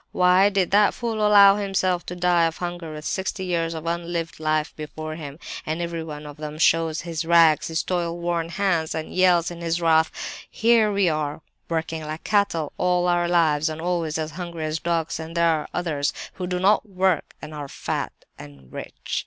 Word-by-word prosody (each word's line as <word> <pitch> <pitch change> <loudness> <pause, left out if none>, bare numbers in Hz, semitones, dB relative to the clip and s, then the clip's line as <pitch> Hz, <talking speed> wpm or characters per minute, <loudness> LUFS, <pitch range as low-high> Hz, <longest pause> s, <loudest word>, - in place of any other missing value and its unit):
Why 185 +2 +5
did 195 -3 0
that 205 +1 +4
fool 230 -2 -3
allow 200 -1 +7
himself 190 -3 0
to 180 - -5
die 175 -1 +3
of 165 - -5
hunger 175 -2 -5
with 155 0 -8
sixty 190 0 -2
years 165 -2 -1
of 160 0 -6
unlived 170 -1 -3
life 155 -1 0
before 155 +1 -6
him? 150 -3 -8 0.3
"And 160 +2 -3
everyone 160 -3 -5
of 145 -1 -9
them 150 0 -6
shows 165 0 +2
his 165 -1 -4
rags, 165 -2 +5
his 160 0 -1
toil 175 -2 -2
worn 170 -1 -2
hands, 175 -3 0
and 160 - -5
yells 180 -2 +3
in 170 0 -8
his 170 0 -1
wrath: 160 -1 +4 0.4
'Here 230 -1 +3 0.2
are 150 -1 -3
we, - - -39 0.3
working 160 -1 -2
like 155 +1 -6
cattle 200 -8 +1
all 180 0 +2
our 175 0 +2
lives, 160 -3 +2
and 155 0 -6
always 165 -2 -1
as 160 0 -3
hungry 170 -1 -5
as 155 +1 -2
dogs, 165 -1 -1
and 160 +1 -6
there 170 - +4
are 160 -2 +1
others 155 -5 -1 0.2
who 180 - -5
do 180 0 -1
not 205 +3 +3
work, 185 -3 0
and 155 0 -9
are 145 -2 -6
fat - - -3 0.3
and 70 -3 -13
rich! - - -5
170 Hz, 195 wpm, -24 LUFS, 155-180 Hz, 0.4 s, allow